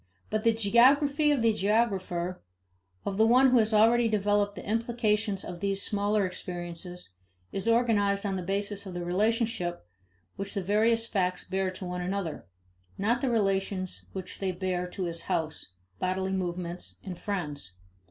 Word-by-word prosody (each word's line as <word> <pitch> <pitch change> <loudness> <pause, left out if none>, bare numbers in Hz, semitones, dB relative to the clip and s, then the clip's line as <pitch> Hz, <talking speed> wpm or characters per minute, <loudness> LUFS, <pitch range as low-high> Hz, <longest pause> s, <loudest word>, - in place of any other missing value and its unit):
But 215 0 0
the 230 - +5
geography 270 +7 +4
of 275 -5 +1
the 225 -1 +4
geographer, 190 -4 0 0.6
of 195 - -2
the 220 +1 +5
one 255 +2 +6
who 250 - +6
has 220 0 +3
already 230 +2 +5
developed 205 -1 +1
the - - -8
implications 220 -2 0
of 180 -1 -7
these 195 +1 0
smaller 205 0 +1
experiences, 175 - -6 0.4
is 195 +3 -3
organized 215 -4 +2
on 195 -1 0
the 185 - -2
basis 200 +2 -2
of 180 - -7
the 175 0 -3
relationship 205 - 0 0.5
which 200 +2 -4
the 195 - -1
various 225 +4 +3
facts 185 -5 -1
bear 190 0 0
to 185 0 -7
one 180 0 -3
another 180 - -3 0.5
not 230 +5 +1
the 270 - +1
relations 195 -4 -1
which 185 -1 -7
they 195 -1 0
bear 180 0 -2
to 185 +1 -5
his 170 -1 -2
house, 160 - -1 0.3
bodily 190 +1 -1
movements, 180 -1 -4
and 180 -3 -7
friends. 150 - -4
200 Hz, 160 wpm, -29 LUFS, 180-220 Hz, 0.6 s, one